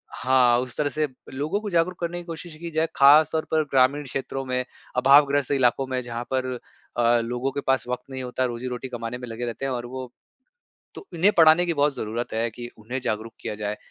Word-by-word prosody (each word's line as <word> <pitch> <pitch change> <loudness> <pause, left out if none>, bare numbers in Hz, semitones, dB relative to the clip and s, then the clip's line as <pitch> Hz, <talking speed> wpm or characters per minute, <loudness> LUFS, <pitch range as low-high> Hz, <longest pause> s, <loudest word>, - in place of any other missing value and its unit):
हाँ, 125 -2 +4
उस 125 -1 -5
तरह 145 -1 +1
से 155 +1 -1 0.3
लोगों 150 +9 -1
को 215 - -4
जागरूक 175 0 +1
करने 175 0 -3
की - - -8
कोशिश 165 -1 -8
की 170 - -5
जाए। 160 +1 +1
खास 145 +3 +7
तौर 160 -1 -1
पर 155 -1 +3
ग्रामीण 135 +2 +3
क्षेत्रों 135 0 -4
में, 125 0 -1 0.3
अभावग्रस्त 140 +1 +5
इलाकों 135 -1 +2
में 130 -1 -2
जहाँ 120 -1 -5
पर 130 -1 0 0.4
अ, 120 0 +4
लोगों 125 +3 -2
के 140 - -3
पास 135 -2 +1
वक़्त 125 0 -3
नहीं 130 -1 -5
होता 125 +1 -1
रोज़ी-रोटी 125 +1 -4
कमाने 120 -1 -5
में 125 0 -8
लगे 115 +1 -5
रहते 120 +3 -4
हैं, 135 - -1
और 120 -1 -3
वो 130 0 -7 0.8
तो - - -10
इन्हें 180 +5 +4
पढ़ाने 160 +1 +7
की 170 - 0
बहुत 145 -2 +1
ज़रूरत 115 +3 -4
है 115 +1 0
कि 120 +2 -8
उन्हें 120 +5 -4
जागरूक 110 0 -3
किया - - -4
जाए, 105 0 -4
130 Hz, 215 wpm, -24 LUFS, 120-150 Hz, 0.8 s, खास